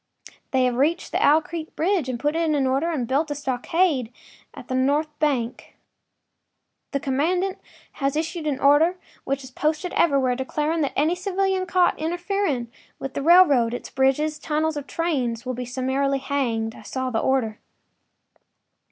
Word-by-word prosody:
They 260 Hz, -1 st, +2 dB
have 245 Hz, -1 st, 0 dB
reached 310 Hz, +6 st, +1 dB
the -, -, +1 dB
Owl 310 Hz, +2 st, +5 dB
Creek 325 Hz, -2 st, -7 dB
bridge, 345 Hz, -5 st, +1 dB
put 295 Hz, +5 st, -1 dB
it 330 Hz, -1 st, +1 dB
in 275 Hz, -2 st, +1 dB
order 270 Hz, +6 st, +1 dB
and 275 Hz, -8 st, -2 dB
built 290 Hz, +5 st, +1 dB
a 290 Hz, -, -2 dB
stockade 270 Hz, 0 st, 0 dB, 0.4 s
on 275 Hz, -, -9 dB
the 255 Hz, -, -5 dB
north 285 Hz, +4 st, +1 dB
bank. 260 Hz, -6 st, -1 dB, 1.1 s
The 280 Hz, -, -1 dB
commandant 355 Hz, +9 st, 0 dB, 0.3 s
has 275 Hz, 0 st, -2 dB
issued 320 Hz, +1 st, -2 dB
an 275 Hz, -3 st, -1 dB
order, 300 Hz, +6 st, +4 dB, 0.3 s
which 275 Hz, 0 st, -2 dB
is 260 Hz, -, -11 dB
posted 310 Hz, +6 st, -1 dB
everywhere, 275 Hz, -6 st, +2 dB
declaring 300 Hz, +5 st, -1 dB
that 280 Hz, -, -1 dB
any 310 Hz, +4 st, +2 dB
civilian 380 Hz, 0 st, -1 dB
caught 365 Hz, -1 st, +2 dB
interfering 345 Hz, -, -1 dB, 0.3 s
with 270 Hz, -, -6 dB
the -, -, -3 dB
railroad, 285 Hz, -8 st, +5 dB
its -, -, -8 dB
bridges, 270 Hz, +4 st, +1 dB
tunnels, 310 Hz, +1 st, -1 dB
or 290 Hz, -, -3 dB
trains 265 Hz, -7 st, -2 dB
will 255 Hz, -, -2 dB
be 250 Hz, +1 st, -5 dB
summarily 265 Hz, +2 st, 0 dB
hanged. 240 Hz, -5 st, -1 dB
I -, -, -13 dB
saw 260 Hz, -1 st, -3 dB
the 225 Hz, -, 0 dB
order. 230 Hz, -5 st, 0 dB
285 Hz, 160 wpm, -24 LUFS, 260-325 Hz, 1.1 s, Owl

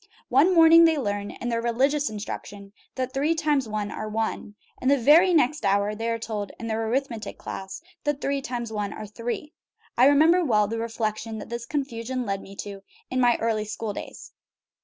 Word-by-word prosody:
One 295 Hz, +9 st, +4 dB
morning 330 Hz, 0 st, +8 dB
they 325 Hz, -1 st, +3 dB
learn 205 Hz, -5 st, -2 dB
(in 240 Hz, -, -5 dB
their 230 Hz, -1 st, 0 dB
religious 270 Hz, +5 st, +1 dB
instruction) 205 Hz, -1 st, -7 dB, 0.2 s
that 255 Hz, -1 st, -3 dB
three 295 Hz, +5 st, +1 dB
times 295 Hz, -6 st, 0 dB
one 210 Hz, -1 st, -3 dB
are 215 Hz, -, -5 dB
one, 215 Hz, -1 st, -3 dB, 0.3 s
and 255 Hz, -, +1 dB
the 280 Hz, -, +5 dB
very 310 Hz, +9 st, +6 dB
next 305 Hz, -2 st, +2 dB
hour 200 Hz, +1 st, +2 dB
they 225 Hz, +2 st, -3 dB
are 230 Hz, -, 0 dB
told 215 Hz, -3 st, -4 dB
in 230 Hz, -, -6 dB
their 225 Hz, 0 st, -2 dB
arithmetic 245 Hz, -2 st, -3 dB
class 190 Hz, +9 st, -7 dB, 0.2 s
that 295 Hz, -2 st, -1 dB
three 280 Hz, -1 st, -1 dB
times 240 Hz, -3 st, -5 dB
one 205 Hz, -1 st, -3 dB
are 215 Hz, -, -7 dB
three. 235 Hz, +8 st, -5 dB, 0.5 s
I 250 Hz, -, +7 dB
remember 315 Hz, +5 st, +5 dB
well 210 Hz, -8 st, +2 dB
the 225 Hz, +2 st, -3 dB
reflection 225 Hz, -1 st, -3 dB
that -, -, -8 dB
this 235 Hz, 0 st, -5 dB
confusion 255 Hz, -3 st, -3 dB
led 195 Hz, -1 st, -2 dB
me 195 Hz, -, -12 dB
to 200 Hz, 0 st, -7 dB, 0.3 s
in 255 Hz, 0 st, +1 dB
my 240 Hz, -1 st, +4 dB
early 220 Hz, -2 st, 0 dB
school 215 Hz, 0 st, -4 dB
days. -, -, -9 dB
230 Hz, 195 wpm, -25 LUFS, 215-280 Hz, 0.5 s, morning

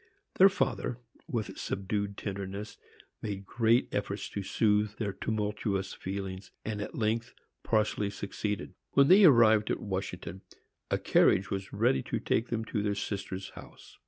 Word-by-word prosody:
Their 195 Hz, +1 st, +9 dB
father, 125 Hz, -9 st, -1 dB, 0.3 s
with 110 Hz, -5 st, -3 dB
subdued 100 Hz, +1 st, -2 dB
tenderness, 100 Hz, +1 st, -5 dB, 0.5 s
made 100 Hz, -2 st, -4 dB
great 115 Hz, +3 st, +2 dB
efforts 100 Hz, 0 st, -2 dB
to 100 Hz, -, -4 dB
soothe 105 Hz, +1 st, +1 dB
their 105 Hz, -4 st, -3 dB
tumultuous 105 Hz, -3 st, -2 dB
feelings, 95 Hz, 0 st, -5 dB, 0.2 s
and 105 Hz, -1 st, -3 dB
at -, -, -6 dB
length 115 Hz, +1 st, -1 dB, 0.3 s
partially 105 Hz, -2 st, +1 dB
succeeded. 100 Hz, +1 st, -4 dB, 0.2 s
When 140 Hz, 0 st, +5 dB
they 195 Hz, +2 st, +8 dB
arrived 110 Hz, -7 st, +6 dB
at -, -, 0 dB
Washington, 95 Hz, -1 st, -5 dB, 0.5 s
a -, -, +2 dB
carriage 95 Hz, -, +3 dB
was 95 Hz, 0 st, -3 dB
ready 65 Hz, 0 st, +2 dB
to -, -, -3 dB
take 115 Hz, -, 0 dB
them 115 Hz, -1 st, -2 dB
to 110 Hz, -2 st, -2 dB
their 100 Hz, 0 st, 0 dB
sister's 95 Hz, -2 st, -4 dB
house. -, -, -14 dB
105 Hz, 145 wpm, -30 LUFS, 100-110 Hz, 0.5 s, Their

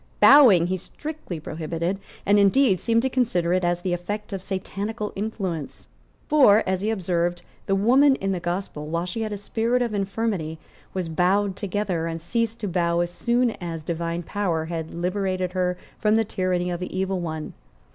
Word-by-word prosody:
Bowing 245 Hz, -, +8 dB
he 185 Hz, +2 st, -1 dB
strictly 295 Hz, -, -7 dB
prohibited, 165 Hz, +4 st, -3 dB, 0.3 s
and, 205 Hz, +1 st, +5 dB
indeed, 200 Hz, 0 st, +4 dB
seemed 230 Hz, 0 st, +2 dB
to -, -, +2 dB
consider 220 Hz, -10 st, +1 dB
it 185 Hz, 0 st, +1 dB
as 175 Hz, 0 st, 0 dB
the 185 Hz, -2 st, 0 dB
effect 205 Hz, +4 st, -4 dB
of 195 Hz, -, -3 dB
Satanical 200 Hz, +3 st, -4 dB
influence; 195 Hz, -7 st, -4 dB, 0.4 s
for, 240 Hz, -8 st, +6 dB
as 190 Hz, 0 st, 0 dB
he 210 Hz, -, 0 dB
observed, 175 Hz, -4 st, -1 dB, 0.2 s
the 195 Hz, -, +2 dB
woman 260 Hz, +7 st, +5 dB
in 195 Hz, -5 st, -2 dB
the 185 Hz, -, -1 dB
Gospel, 175 Hz, -3 st, -4 dB
while 170 Hz, +2 st, -1 dB
she 180 Hz, +5 st, -4 dB
had 215 Hz, -1 st, -2 dB
a 205 Hz, -, -3 dB
spirit 230 Hz, +4 st, 0 dB
of 235 Hz, -3 st, -3 dB
infirmity, 195 Hz, -5 st, -2 dB, 0.3 s
was 185 Hz, -3 st, -3 dB
bowed 185 Hz, +4 st, +1 dB
together, 195 Hz, -5 st, -2 dB
and 165 Hz, 0 st, -4 dB
ceased 230 Hz, +6 st, -2 dB
to 210 Hz, -, -2 dB
bow 170 Hz, -1 st, +1 dB
as 175 Hz, 0 st, -2 dB
soon 240 Hz, +5 st, +1 dB
as 165 Hz, -2 st, -5 dB
Divine 170 Hz, +1 st, -3 dB
power 170 Hz, -4 st, -1 dB
had 160 Hz, -1 st, -4 dB
liberated 185 Hz, +1 st, -1 dB
her 180 Hz, -1 st, 0 dB, 0.2 s
from 215 Hz, 0 st, +3 dB
the 225 Hz, 0 st, +3 dB
tyranny 180 Hz, -2 st, -1 dB
of 175 Hz, -, -3 dB
the 180 Hz, 0 st, -5 dB
Evil 190 Hz, 0 st, 0 dB
One. 160 Hz, -3 st, -5 dB
185 Hz, 180 wpm, -24 LUFS, 175-210 Hz, 0.4 s, Bowing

